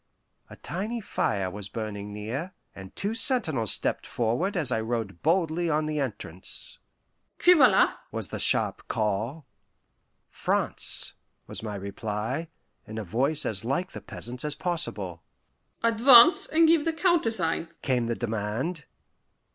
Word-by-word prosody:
A -, -, -10 dB
tiny 215 Hz, +7 st, -4 dB
fire 100 Hz, -, -1 dB
was 100 Hz, 0 st, -6 dB
burning 105 Hz, -2 st, -5 dB
near, 120 Hz, -, -5 dB, 0.2 s
and 95 Hz, 0 st, -11 dB
two 205 Hz, +2 st, -1 dB
sentinels 165 Hz, -, 0 dB
stepped -, -, 0 dB
forward 125 Hz, -, 0 dB
as 150 Hz, -7 st, -1 dB
I 110 Hz, -, +1 dB
rode 110 Hz, -5 st, -3 dB
boldly 170 Hz, 0 st, +1 dB
on 155 Hz, 0 st, +1 dB
the 155 Hz, -1 st, -2 dB
entrance. 100 Hz, -, -4 dB, 0.6 s
"Qui 360 Hz, -, +7 dB
va 285 Hz, -7 st, +7 dB
la?" 190 Hz, -4 st, +4 dB, 0.2 s
was 110 Hz, -6 st, -4 dB
the -, -, -5 dB
sharp -, -, +1 dB
call. 110 Hz, +8 st, -2 dB, 0.9 s
"France," -, -, +1 dB, 0.3 s
was -, -, -5 dB
my 105 Hz, -2 st, -5 dB
reply, 105 Hz, -, -4 dB, 0.4 s
in 110 Hz, -, -7 dB
a 110 Hz, -, -3 dB
voice 135 Hz, -, 0 dB
as 100 Hz, -2 st, -1 dB
like 160 Hz, +10 st, -1 dB
the -, -, -8 dB
peasant's 125 Hz, +1 st, -6 dB
as 150 Hz, -1 st, 0 dB
possible. 110 Hz, -, -2 dB, 0.6 s
"Advance 235 Hz, +6 st, +7 dB
and 325 Hz, +1 st, +4 dB
give 325 Hz, -2 st, +5 dB
the 330 Hz, -, 0 dB
countersign," 225 Hz, -, +1 dB, 0.2 s
came 125 Hz, -4 st, +1 dB
the 115 Hz, -, -1 dB
demand. 120 Hz, -, -3 dB
130 Hz, 140 wpm, -27 LUFS, -, 0.9 s, Qui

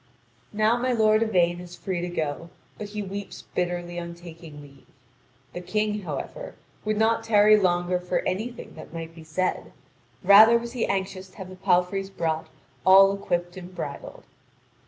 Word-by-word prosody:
Now 215 Hz, +2 st, +2 dB
my 250 Hz, +1 st, 0 dB
lord 215 Hz, -1 st, +3 dB
Yvain 175 Hz, -6 st, +2 dB
is 175 Hz, 0 st, -10 dB
free 185 Hz, -3 st, -4 dB
to 175 Hz, -, -3 dB
go, 160 Hz, -1 st, -3 dB, 0.3 s
but 210 Hz, -, -5 dB
he 210 Hz, 0 st, -5 dB
weeps 200 Hz, 0 st, -7 dB
bitterly 175 Hz, -1 st, -2 dB
on 170 Hz, 0 st, -7 dB
taking 165 Hz, -3 st, -12 dB
leave. 140 Hz, -2 st, -16 dB, 0.7 s
The 175 Hz, -, -6 dB
King, 210 Hz, +2 st, -1 dB
however, -, -, -6 dB, 0.3 s
would 215 Hz, 0 st, -1 dB
not 225 Hz, +1 st, +2 dB
tarry 215 Hz, -1 st, +5 dB
longer 180 Hz, -2 st, +1 dB
for 180 Hz, 0 st, -1 dB
anything 220 Hz, +6 st, -4 dB
that 160 Hz, +1 st, -11 dB
might 165 Hz, 0 st, -6 dB
be 165 Hz, -1 st, -12 dB
said: 170 Hz, +4 st, -2 dB, 0.5 s
rather 215 Hz, +5 st, +8 dB
was 235 Hz, 0 st, -6 dB
he 245 Hz, -2 st, -2 dB
anxious 190 Hz, -1 st, -3 dB
to 185 Hz, -, -22 dB
have 190 Hz, -3 st, -8 dB
the 185 Hz, -, -10 dB
palfreys 190 Hz, +1 st, +1 dB
brought 160 Hz, -4 st, -2 dB, 0.4 s
all 195 Hz, +3 st, +7 dB
equipped 175 Hz, -2 st, -3 dB
and 180 Hz, 0 st, -10 dB
bridled. -, -, -7 dB
185 Hz, 165 wpm, -25 LUFS, 175-215 Hz, 0.7 s, rather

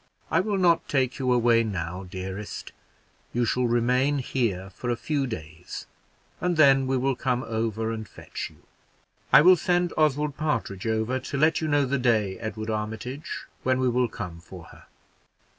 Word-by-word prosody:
I -, -, +4 dB
will 205 Hz, +1 st, 0 dB
not 175 Hz, -3 st, +3 dB
take 130 Hz, -2 st, +1 dB
you 130 Hz, -1 st, +1 dB
away 120 Hz, -1 st, +4 dB
now, 90 Hz, -3 st, -4 dB
dearest; 95 Hz, +3 st, -6 dB, 0.6 s
you 120 Hz, 0 st, +1 dB
shall 125 Hz, +2 st, +1 dB
remain 125 Hz, +4 st, +2 dB
here 110 Hz, -8 st, -1 dB
for 120 Hz, +6 st, -5 dB
a 120 Hz, -, +2 dB
few 140 Hz, +2 st, -1 dB
days, 80 Hz, -6 st, -7 dB, 0.5 s
and 175 Hz, -2 st, 0 dB
then 135 Hz, -3 st, +6 dB
we 130 Hz, 0 st, +1 dB
will 135 Hz, +1 st, +1 dB
come 125 Hz, 0 st, -1 dB
over 110 Hz, -1 st, -2 dB
and 110 Hz, -2 st, -5 dB
fetch -, -, -7 dB
you. -, -, -22 dB, 0.7 s
I 145 Hz, -, +9 dB
will 180 Hz, +4 st, +8 dB
send 175 Hz, 0 st, +1 dB
Oswald 150 Hz, -1 st, +1 dB
Partridge 115 Hz, -9 st, -2 dB
over 110 Hz, +3 st, 0 dB
to 140 Hz, -, -5 dB
let 155 Hz, +4 st, +3 dB
you 160 Hz, -, -1 dB
know 145 Hz, -2 st, +3 dB
the 135 Hz, +1 st, 0 dB
day, 110 Hz, -6 st, +1 dB
Edward 110 Hz, 0 st, -4 dB
Armitage, 110 Hz, +6 st, -4 dB, 0.2 s
when 130 Hz, 0 st, +1 dB
we 130 Hz, -1 st, +2 dB
will 125 Hz, 0 st, +2 dB
come 85 Hz, -6 st, -7 dB
for 90 Hz, 0 st, -11 dB
her. -, -, -17 dB
125 Hz, 175 wpm, -26 LUFS, 110-140 Hz, 0.7 s, I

